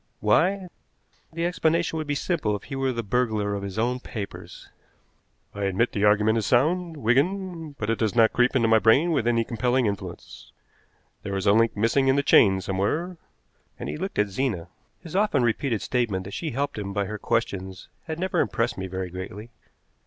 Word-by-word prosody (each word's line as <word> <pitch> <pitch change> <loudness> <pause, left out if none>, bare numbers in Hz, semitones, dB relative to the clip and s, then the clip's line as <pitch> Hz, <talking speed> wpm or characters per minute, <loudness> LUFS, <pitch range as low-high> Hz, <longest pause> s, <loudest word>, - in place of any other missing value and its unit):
Why? 180 - +2 0.6
The 165 +1 -2
explanation 170 -1 +1
would 155 -1 -4
be 145 - -1
simple 140 - -1
if 100 - -7
he 135 - -7
were 135 -1 0
the 115 -2 -3
burglar 110 -2 0
of 100 - -3
his 100 0 -6
own 125 +3 0
papers." 105 -5 -8 0.9
"I 100 0 -3
admit 100 +5 +1
the 105 0 0
argument 105 +2 +3
is 110 - -3
sound, 165 +6 +1
Wigan, 160 - 0
but 110 +1 -1
it 115 - -1
does 110 -2 0
not 115 -2 +5
creep 125 +2 +2
into 115 -3 +3
my 110 0 +5
brain 135 +11 +4
with 140 -7 +1
any 115 -1 +2
compelling 125 +2 0
influence. 100 -2 -6 0.7
There 100 - -4
is 95 - -3
a 100 - +5
link 115 0 +2
missing 115 +6 +2
in 135 - +4
the 140 - +2
chain 95 -7 +5
somewhere," 105 - -2 0.6
and - - -5
he - - -4
looked 190 +4 -5
at 105 -1 +2
Zena. 100 -5 -2 0.3
His 165 0 -9
often 195 -10 +2
repeated 120 -1 0
statement 115 -7 -1
that 100 +1 -9
she 165 - -3
helped 140 -2 -2
him 100 -1 -5
by 100 0 0
her 105 +2 -6
questions 95 -5 -2 0.2
had 160 -2 -4
never 185 +1 -1
impressed 95 -1 0
me 95 - -4
very 95 -1 -5
greatly. 95 +5 -8
115 Hz, 195 wpm, -25 LUFS, 100-145 Hz, 0.9 s, not